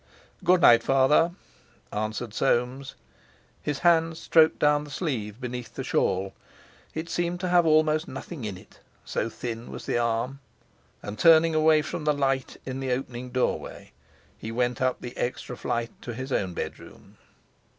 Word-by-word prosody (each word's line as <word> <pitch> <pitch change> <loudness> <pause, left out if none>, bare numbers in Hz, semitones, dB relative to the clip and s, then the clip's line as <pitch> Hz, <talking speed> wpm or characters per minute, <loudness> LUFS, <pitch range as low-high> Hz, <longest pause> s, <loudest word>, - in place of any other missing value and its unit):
"Good 180 0 +4
night, 115 -5 +7
father," 135 +7 +3 0.6
answered 110 +1 -3
Soames. 130 +3 0 0.7
His 150 -2 -2
hand 165 -1 +4
stroked 160 -1 +4
down 150 0 +3
the 150 - -11
sleeve 120 - -3
beneath 125 -2 -6
the - - -4
shawl; 95 +1 0 0.6
it 160 +1 -4
seemed 175 0 -2
to 185 - -1
have 175 -2 +4
almost 155 0 +3
nothing 160 -8 -7
in 100 -4 -4
it, - - -18 0.3
so 115 - -2
thin 115 0 -6
was - - -8
the - - 0
arm. 120 +3 -1 0.6
And, 105 +1 -7
turning 165 +3 +6
away 155 -1 +4
from 150 - -5
the 150 - +3
light 135 -2 -1
in 130 0 -4
the 135 -1 -2
opening 125 -1 -3
doorway, 125 0 -2 0.4
he 110 - -7
went 125 +2 -1
up 130 -1 0
the 120 0 -7
extra 125 0 -3
flight 120 -1 -2
to 120 - -6
his 130 +3 -6
own 95 -7 -1
bedroom. - - -8
130 Hz, 160 wpm, -26 LUFS, 120-155 Hz, 0.7 s, night